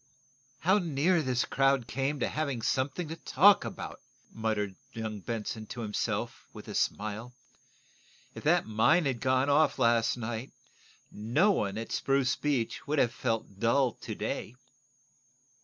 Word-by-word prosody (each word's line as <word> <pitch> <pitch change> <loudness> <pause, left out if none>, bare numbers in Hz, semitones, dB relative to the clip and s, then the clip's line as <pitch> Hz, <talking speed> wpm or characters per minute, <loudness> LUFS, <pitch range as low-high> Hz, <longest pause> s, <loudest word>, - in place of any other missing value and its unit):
"How 190 +5 +4
near 170 +1 +2
this 130 -4 0
crowd 135 -2 +2
came 135 +4 -2
to - - +2
having 140 -7 -2
something 140 +6 -1
to 160 - -4
talk 185 +5 +5
about," - - -7 0.3
muttered 105 -3 -2 0.2
young 110 -2 -4
Benson 110 +1 -4
to 120 - -6
himself, 105 -2 -3
with - - -11
a - - -6
smile. 110 +4 -2 1.0
"If - - -9
that - - +4
mine 115 +10 +3
had 130 -4 -1
gone 130 +1 +2
off 145 +2 +3
last 115 -2 +3
night, 120 +1 -5 0.6
no 125 - +2
one 100 - -1
at 115 - -5
Spruce 135 -2 +1
Beach 140 -6 -2
would 150 +2 0
have 120 -4 +3
felt 115 -5 -3
dull 120 +3 +3
to - - -7
day." 115 - -4
125 Hz, 145 wpm, -30 LUFS, 110-145 Hz, 1.0 s, talk